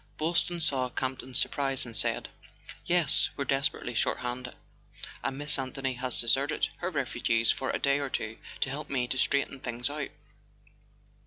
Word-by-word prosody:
Boylston 170 +2 +1
saw 130 -5 +3
Campton's 130 0 -2
surprise, 135 -2 +2
and 115 -2 -7
said: - - 0 0.6
"Yes, 170 -4 +4
we're 140 - -1
desperately 135 -3 0
short - - +1
handed, 125 0 -4 0.7
and 135 - -2
Miss 145 0 +3
Anthony 135 0 -2
has 125 0 -1
deserted 135 +6 +2
her 175 - -2
refugees 120 -6 +1
for 130 - -2
a - - +1
day 140 0 +2
or 140 -1 -2
two 110 -3 -3 0.2
to 135 - +1
help 145 +2 -5
me 125 -3 0
to 130 - -2
straighten 140 -1 +1
things 125 +1 -1
out." 145 -1 -3
135 Hz, 160 wpm, -29 LUFS, 125-140 Hz, 0.7 s, Yes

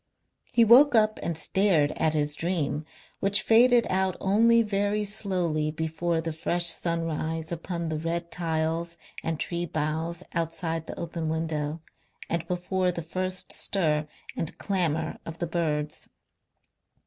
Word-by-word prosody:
He 235 -1 +5
woke 255 +4 +7
up 215 -1 +3
and 170 -2 -3
stared 165 -5 +2
at 160 -1 0
his 150 -1 +1
dream, 155 -3 -1 0.3
which 200 +1 +4
faded 240 +1 +5
out 190 -1 0
only 230 +4 +4
very 205 0 0
slowly 180 -7 0
before 160 +1 -1
the 165 -1 -4
fresh 170 +2 0
sun 170 0 +1
rise 160 0 -3
upon 170 0 -4
the 155 -1 -2
red 170 +1 -3
tiles 165 0 -1 0.2
and 160 -1 -2
tree 175 0 -2
boughs 160 +3 -2
outside 165 -1 -2
the - - -7
open 165 -1 -3
window, 160 -1 -2 0.5
and 170 -1 -1
before 180 +1 0
the 170 -1 -5
first 185 +3 -2
stir 155 -6 0 0.3
and 165 - -3
clamour 160 -5 -1
of 165 0 -8
the 170 - -2
birds. 155 -3 -2
170 Hz, 140 wpm, -27 LUFS, 160-185 Hz, 0.5 s, woke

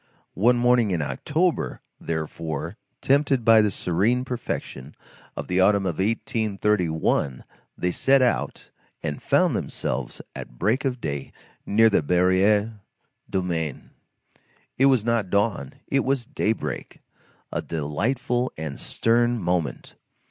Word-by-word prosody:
One 120 +4 +5
morning 120 -2 +3
in 85 -5 0
October, 165 - -1 0.2
therefore, 80 +1 -4 0.3
tempted 140 -3 +2
by 115 -1 +7
the 105 - +2
serene 100 +8 0
perfection 75 - -5 0.4
of - - -4
the 90 +1 0
autumn 100 +1 +4
of 90 -3 -2
1831, 100 - 0 0.3
they 90 - 0
set 135 +8 +3
out, 125 - -1 0.3
and 75 -1 -3
found - - +2
themselves - - -3 0.2
at - - -9
break 110 - +1
of 125 -2 -1
day 70 -1 -4 0.4
near 115 +2 +5
the 105 - +3
Barrière 95 +6 +2 0.5
du 95 -2 0
Maine. 80 -5 -3 0.8
It 135 - +4
was 130 -5 +3
not 115 -5 +1
dawn, 100 - 0
it 135 -1 +1
was 135 -2 0
daybreak; 115 -5 -3 0.5
a - - -2
delightful 120 - -1
and 75 -3 -5
stern 120 +1 +1
moment. 85 - -2
105 Hz, 125 wpm, -24 LUFS, 85-120 Hz, 0.8 s, by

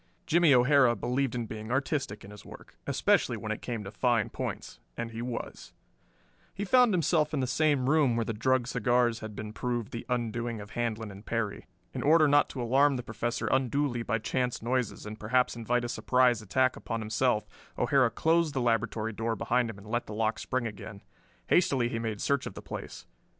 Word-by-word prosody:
Jimmie 170 -1 +4
O'Hara 125 -1 +5
believed 125 +3 -1
in 120 -2 -2
being 110 0 -7
artistic 135 -6 -2
in 100 - -11
his 105 0 -12
work, - - -13
especially - - +2
when - - -5
it - - -4
came 115 -3 -4
to 95 - -8
fine 115 0 +1
points, - - -5 0.2
and 115 0 -4
he 115 0 -6
was. 120 -1 -6 0.8
He 200 - -3
found 250 +2 +5
himself 160 -4 +1
in - - 0
the 130 - +1
same 140 0 +1
room 145 -5 +3
where 115 -1 0
the 115 - -2
drugged 130 +3 +1
cigars 120 -1 +1
had 110 -2 -8
been 105 +1 -6
proved 120 -1 -3
the 115 - -6
undoing 120 -1 -2
of 105 +1 -10
Handlon 110 -2 -3
and 100 +1 -12
Perry. 110 -3 -3 0.3
In - - -4
order 155 +1 +5
not 145 0 +4
to 125 - -4
alarm 135 +4 +3
the 125 - -4
Professor 115 +2 -3
unduly 130 -1 +1
by 115 0 -1
chance 125 +2 -1
noises 125 -2 -1
and 105 +1 -7
perhaps 125 +4 +1
invite 120 +1 -1
a - - -2
surprise 125 -1 +2
attack 130 +6 +1
upon 115 -1 -4
himself, 110 +1 0 0.3
O'Hara 130 -2 +3
closed 165 +2 +1
the - - +1
laboratory 115 -1 0
door 115 +2 -2
behind 120 +3 0
him 110 - -7
and 100 - -13
let 120 +2 -2
the 105 - -6
lock 110 0 0
spring 130 -2 -2
again. 105 -2 -8 0.4
Hastily 135 - +2
he 115 - -3
made 110 -3 -3
search 140 -1 0
of - - -8
the - - -9
place. - - -8
120 Hz, 200 wpm, -29 LUFS, 110-130 Hz, 0.8 s, O'Hara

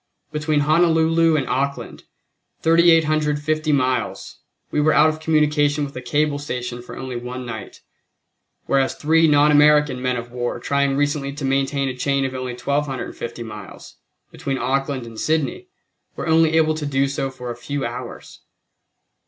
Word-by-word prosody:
Between 150 -1 0
Honolulu 165 +1 +3
and 135 -4 0
Auckland, 140 +2 -3 0.6
3850 155 -2 +3
miles, 130 -3 -1 0.3
we 150 - +1
were 155 +1 +3
out 150 +2 +5
of 155 0 -4
communication 150 -2 +2
with 140 - -10
a 130 - -5
cable 145 +4 0
station 125 -4 -5
for 125 - -10
only 130 -1 -6
one 125 +1 -6
night, 115 -2 -8 0.8
whereas 135 -1 +1
three 160 +2 +3
[non 150 0 +4
American] 150 -3 +4
men 125 -1 0
of 120 0 -7
war 120 -1 -3
trying 140 +2 0
recently 145 -1 0
to 145 -1 -5
maintain 135 +1 0
a 130 - -3
chain 135 +1 0
of 130 - -3
only 130 -1 -4
1250 130 -3 -3
miles, 105 -3 -11 0.3
between 135 -1 -3
Auckland 135 0 -1
and 115 -1 -10
Sydney, 160 - -1 0.5
were - - -5
only 160 0 +3
able 155 -1 +3
to 155 -1 -4
do 135 -1 +1
so 135 0 -2
for 125 -2 -7
a - - -6
few 140 +4 -4
hours. 120 0 -8
140 Hz, 155 wpm, -21 LUFS, 130-155 Hz, 0.8 s, out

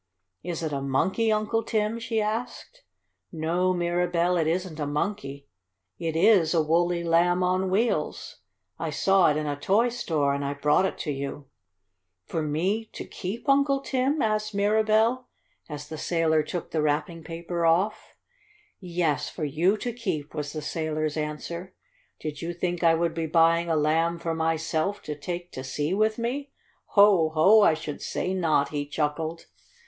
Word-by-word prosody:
"Is 170 -1 -4
it 155 - -2
a 140 - -2
monkey, 190 +12 +1
Uncle 215 +1 +1
Tim?" 220 0 -1
she 230 -1 -1
asked. 240 - -4 0.5
"No, 170 +3 0
Mirabell, 175 0 +1
it 155 - 0
isn't 170 -1 -2
a 145 - -2
monkey. 145 -3 -3 0.5
It 165 -2 -2
is 170 -2 +4
a 165 - +4
woolly 170 +2 +1
Lamb 175 +2 +3
on 185 +1 +1
Wheels. 195 -5 -1 0.4
I 165 - -2
saw 190 +5 +3
it 150 - +1
in 155 - -2
a 145 -1 -1
toy 200 +11 +2
store 155 -12 0
and 140 0 -2
I 140 0 -2
brought 150 +6 +3
it - - -6
to 150 - -1
you." 140 0 -5 0.8
"For 165 - -3
me 180 +9 -1
to - - -6
keep, 205 +8 -6
Uncle 275 0 +3
Tim?" 270 +2 0
asked 215 -1 -1
Mirabell, 220 +4 +2 0.4
as 150 -1 -7
the 155 0 -7
sailor 165 -2 +2
took 160 +3 -5
the 160 - 0
wrapping 155 +3 -1
paper 170 +1 -4
off. 185 +6 0 0.6
"Yes, 175 -4 -1
for 155 - -4
you 170 +8 +2
to 240 +3 -4
keep," 185 -11 -4
was 150 -2 -4
the 155 -1 -5
sailor's 155 -1 -2
answer. 165 +4 -5 0.4
"Did 150 -2 -5
you 170 +1 -4
think 175 0 -2
I 165 -1 +5
would 170 0 0
be 165 -1 -2
buying 165 +1 +3
a 165 - +2
Lamb 160 +3 +1
for 165 -1 -3
myself, 165 +4 -1
to 150 - -4
take 175 +4 -6
to 130 - -7
sea 145 +5 -2
with 215 +2 +1
me? 265 +4 -3 0.5
Ho! 200 -6 +6
Ho! 200 +8 +6
I 165 - +5
should 155 -2 -6
say 185 - -2
not!" 160 -6 +1
he 145 -1 -3
chuckled. 155 +2 -2
170 Hz, 170 wpm, -26 LUFS, 155-200 Hz, 0.8 s, Ho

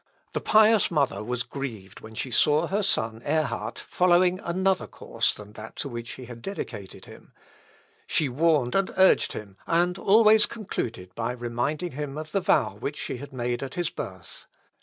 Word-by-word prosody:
The - - -2
pious 220 0 +5
mother 140 -9 0
was 125 +1 -2
grieved 110 -9 -7
when 110 0 -12
she 130 +3 -3
saw 150 +7 +4
her 200 +5 0
son 115 - 0
Ehrhard 125 -8 -1
following 180 0 +3
another 185 +1 0
course - - -1
than 105 0 -10
that 110 +1 -10
to - - -4
which 120 -1 -6
she 130 - -9
had 120 -1 -10
dedicated 105 - -7
him; - - -15 0.7
she 155 - +1
warned 140 -2 +2
and 195 -1 +2
urged 190 0 +5
him, 100 -2 -8
and 175 +2 +2
always 215 +1 +6
concluded 115 - -5
by 115 +1 -2
reminding 125 +8 -2
him 145 +1 -5
of 155 0 -6
the 195 - +1
vow 105 - +2
which 145 +6 -4
she - - -4
had 140 +3 -9
made 120 -1 -2
at 135 +1 -6
his 175 -2 -1
birth. 95 -2 -8
140 Hz, 175 wpm, -26 LUFS, 115-180 Hz, 0.7 s, always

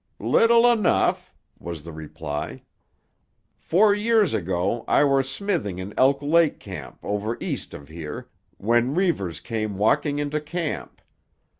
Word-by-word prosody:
"Little 230 +1 +4
enough," 220 -5 +1 0.3
was 85 -3 -7
the 85 - -8
reply. 75 -2 -6 1.0
"Four 200 +5 +4
year 220 +1 +3
ago 100 - -1
I - - +4
were 135 -1 +3
smithing 135 - -2
in 95 +2 -6
Elk 135 +2 +3
Lake 160 +1 +3
Camp - - -9
over 105 +3 -2
east - - -5
of 70 - -11
here, 80 -1 -7 0.3
when 120 +5 +1
Reivers 100 - 0
came 110 -3 -4
walking 145 +8 +2
into 145 +1 -2
camp. 160 +1 -5
120 Hz, 130 wpm, -24 LUFS, -, 1.0 s, Little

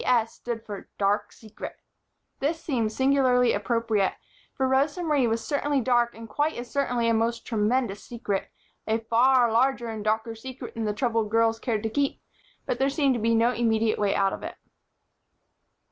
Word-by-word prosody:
S. 230 -3 +2
stood 230 -2 -6
for 205 -2 -8
"Dark 205 +1 +1
Secret." 220 -1 -9 0.6
This 315 +4 -1
seemed 235 -9 -1
singularly 255 -1 +3
appropriate, 215 -1 0 0.4
for 265 - +1
Rosa 285 +6 +1
Marie 295 -6 +2
was 225 0 -1
certainly 285 -1 0
dark 240 -1 +2
and 225 0 -9
quite 295 +7 0
as 240 0 -7
certainly 250 -4 0
a 230 - +3
most 230 +1 0
tremendous 220 -1 0
secret 210 -5 -3 0.4
a 220 0 +2
far 235 +2 +3
larger 240 0 +2
and 220 -2 -5
darker 220 +2 0
secret 255 +3 -8
than 225 -2 -3
the 210 - 0
troubled 225 -1 0
girls 225 0 +2
cared 225 -3 -2
to 220 - 0
keep, 280 +2 0 0.5
but - - -2
there 270 +1 +3
seemed 280 -1 +2
to 235 - -2
be 230 +1 +2
no 230 +2 +4
immediate 225 -2 +1
way 205 -1 +1
out 195 -1 +2
of - - -6
it. - - -6
230 Hz, 175 wpm, -26 LUFS, 220-260 Hz, 0.6 s, no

